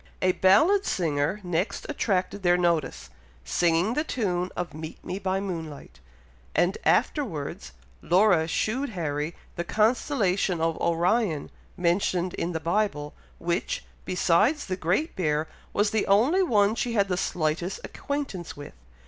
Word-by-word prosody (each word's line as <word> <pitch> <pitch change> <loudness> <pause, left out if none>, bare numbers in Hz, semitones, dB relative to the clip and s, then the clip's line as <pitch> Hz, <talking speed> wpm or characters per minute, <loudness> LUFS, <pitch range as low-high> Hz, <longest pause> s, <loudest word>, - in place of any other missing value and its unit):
A 185 - +5
ballad 220 - +4
singer 160 - 0
next 175 +2 -2
attracted 200 -8 -1
their 175 -1 +4
notice, 170 - 0 0.3
singing 170 - +2
the 300 - 0
tune 185 - -1
of 175 -2 -4
"Meet 155 +1 -8
me 185 +2 -4
by 190 -1 -1
moonlight," 165 - -6 0.6
and 180 +2 +3
afterwards 160 - 0 0.3
Laura 180 -3 +4
shewed 255 +11 -1
Harry 150 0 -2 0.2
the 170 - -1
constellation 210 - +1
of 165 0 +1
Orion 170 -1 +1 0.3
mentioned 180 0 +1
in 170 - -2
the 160 - -2
Bible, 165 -4 -1 0.2
which, 170 +1 -2 0.2
besides 205 - +2
the 185 - -2
Great 185 - 0
Bear, 155 -3 0 0.2
was 205 0 +1
the 220 -2 0
only 245 - +4
one 210 - +3
she 235 +1 -2
had 200 -3 +2
the 180 - 0
slightest 170 +1 -1
acquaintance 275 - -5
with. 145 - -9
180 Hz, 135 wpm, -26 LUFS, 165-210 Hz, 0.6 s, A